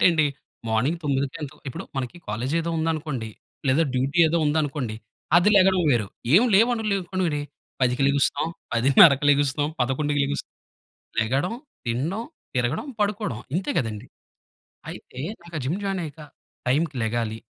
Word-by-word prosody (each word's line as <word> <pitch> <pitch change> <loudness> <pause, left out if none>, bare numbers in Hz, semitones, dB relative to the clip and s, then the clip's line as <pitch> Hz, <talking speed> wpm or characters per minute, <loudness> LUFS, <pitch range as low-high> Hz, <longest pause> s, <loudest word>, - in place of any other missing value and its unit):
ఏంటండి 160 -4 +5 0.4
మార్నింగ్ 125 +10 +1
9కొ 140 -2 -1
ఎంతో 150 +1 -7
ఇప్పుడు 130 - -6
మనకి 130 +4 -3
కాలేజ్ 120 +7 -2
ఏదో 170 +1 -3
ఉందనుకోండి 155 -7 -2 0.4
లేదా 135 +5 +4
డ్యూటీ 135 +6 0
ఏదో 165 +2 +1
ఉందనుకోండి 145 -6 -1 0.4
అది 175 +4 +5
లెగడం 190 -1 +5
వేరు. 115 -5 +2 0.3
ఏం 195 - +8
లేవను 230 +3 +4
లేకపోవడం 185 -1 -1
ఏటి. 150 -1 -1 0.4
10కి 125 +1 +2
లెగుస్తాం. 140 +2 +1 0.3
10:30కి 135 +4 +6
లెగుస్తాం. 145 0 +2
11కి 145 +4 +1
లెగుస్తాం. 140 +1 -4 0.7
లెగడం 135 - 0 0.3
తినడం 145 - -1 0.3
తిరగడం 125 - 0
పడుకోవడం 205 - -1 0.2
ఇంతే 185 - -2
గదండీ. 115 -4 -3 0.8
అయితే 125 - -10 0.2
నాకా 170 -1 -7
జిమ్ 155 +10 -1
జాయిన్ 195 -1 -1
అయ్యాక 155 -1 -8 0.5
టైంకి 150 +4 +1
లెగాలి, 110 0 -1
145 Hz, 135 wpm, -24 LUFS, 125-170 Hz, 0.8 s, ఏం